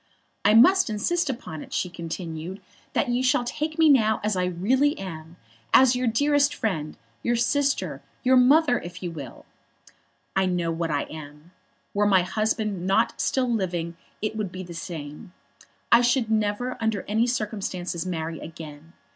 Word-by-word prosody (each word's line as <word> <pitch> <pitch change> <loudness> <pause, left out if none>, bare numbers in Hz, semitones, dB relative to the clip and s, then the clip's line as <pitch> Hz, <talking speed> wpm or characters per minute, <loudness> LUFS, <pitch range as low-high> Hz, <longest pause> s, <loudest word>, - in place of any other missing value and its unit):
"I 210 +1 +5
must 370 +8 +6
insist 290 +11 0
upon 195 - -5
it," - - -11
she - - 0
continued, 170 +1 -6 0.3
"that 260 - +1
you 245 +1 +1
shall 255 -1 +2
take 305 +5 -3
me 320 -1 +5
now 220 -7 +4
as 210 -1 0
I 180 0 +1
really 250 - +1
am, 165 -3 -8 0.4
as 260 -1 +6
your 250 0 0
dearest 285 +4 +2
friend, 160 -8 -3 0.2
your 240 - +1
sister, 280 +4 0 0.2
your 260 0 +4
mother, 260 +1 +5
if 175 +1 -9
you 175 - -3
will. 140 -7 -9 0.9
I 190 -1 +2
know 175 -2 0
what 165 0 -2
I 145 -2 0
am. 150 +1 -11 0.4
Were 205 0 +2
my 190 -3 +4
husband 210 -1 -1
not 210 +4 +1
still 260 -1 +1
living 175 -5 -2 0.3
it 215 0 -1
would 210 -4 -3
be 185 0 -6
the 175 -1 -9
same. 165 0 -8 0.6
I 235 - +7
should 245 -2 +1
never 215 +4 0
under 220 -3 0
any 220 +3 +2
circumstances 200 -7 -3
marry 165 -3 -4
again. 155 0 -10
205 Hz, 165 wpm, -25 LUFS, 170-245 Hz, 0.9 s, I